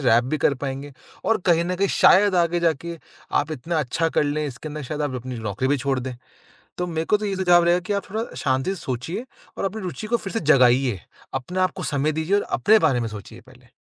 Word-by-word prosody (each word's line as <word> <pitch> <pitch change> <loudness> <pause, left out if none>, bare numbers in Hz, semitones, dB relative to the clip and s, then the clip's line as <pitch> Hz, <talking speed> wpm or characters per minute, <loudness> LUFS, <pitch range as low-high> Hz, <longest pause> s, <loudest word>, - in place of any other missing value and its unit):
Rap 120 +2 +5
भी 155 +4 -2
कर 140 - +2
पाएँगे 140 +1 -5 0.3
और 225 - +2
कहीं 170 -1 +4
न 180 +1 -1
कहीं 200 +2 +1
शायद 200 +1 +5
आगे 175 0 +2
जाके 170 +1 -1 0.4
आप 150 +2 -4
इतना 160 +4 -2
अच्छा 155 +4 0
कर - - +5
लें 150 +1 -1
इसके 135 +3 -7
अंदर 150 0 -6
शायद 150 +3 -4
आप 145 -3 -2
अपनी 125 0 -5
नौकरी 110 +4 -2
भी 145 - +3
छोड़ 135 -1 -1
दें। 130 0 -5 0.6
तो 180 - -1
मेरे 160 -1 -2
को 210 - +4
तो 210 - -4
ये 195 -2 -2
सुझाव 175 -2 +5
रहेगा 175 +1 +3
कि 205 +4 -4
आप 200 - -1
थोड़ा 220 +2 -2
शांति 130 +6 0
से - - -9
सोचिए 135 - -4 0.3
और - - -2
अपनी 195 +2 -3
रूचि 185 +4 -5
को 235 +2 +2
फिर 195 - -7
से 225 - -1
जगाइए। 130 - +4 0.3
अपने 180 +8 -3
आपको 185 - 0
समय 145 +1 0
दीजिए 160 +6 +1
और 205 - +1 0.2
अपने 220 +1 +5
बारे 135 -10 +2
में 115 - -2
सोचिए 105 -3 -10
पहले। - - -20
155 Hz, 240 wpm, -23 LUFS, 130-185 Hz, 0.6 s, Rap